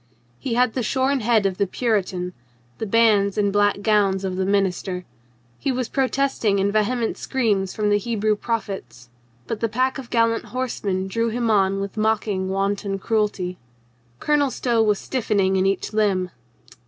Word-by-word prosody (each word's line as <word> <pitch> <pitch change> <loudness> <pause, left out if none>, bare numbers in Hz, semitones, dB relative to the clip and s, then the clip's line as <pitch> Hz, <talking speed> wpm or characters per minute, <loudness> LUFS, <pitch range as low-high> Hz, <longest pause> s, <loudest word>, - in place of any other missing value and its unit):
He 235 - -2
had 250 -1 +3
the 255 - -1
shorn 265 +3 +1
head 225 -3 +2
of 190 -1 -1
the 200 - +2
Puritan, 185 -5 -1 0.5
the 220 - -3
bands 210 -2 +3
and 200 -1 +1
black 205 0 +2
gown 205 -3 +3
of 185 -1 -2
the 190 0 -1
minister. 190 -2 0 0.5
He 275 - 0
was 255 -2 -2
protesting 265 -6 +1
in 200 +1 +1
vehement 220 +2 0
screams 210 -8 0
from 210 -1 +1
the 205 - +3
Hebrew 215 -1 0
prophets. 190 - -5 0.4
But 220 - -4
the 230 - 0
pack 260 +5 0
of 250 -3 -9
gallant 230 -1 +1
horsemen 205 -7 -2
drove 230 +3 -1
him 235 -1 0
on 195 -1 +2
with 200 +2 -5
mocking 215 -3 0
wanton 195 +1 -1
cruelty. 200 -4 -1 0.6
Colonel 295 -2 +2
Stow 240 -2 0
was 210 -2 +3
stiffening 205 -7 0
in 190 0 +2
each 195 +2 -1
limb. 195 -4 +1
210 Hz, 165 wpm, -22 LUFS, 195-230 Hz, 0.6 s, had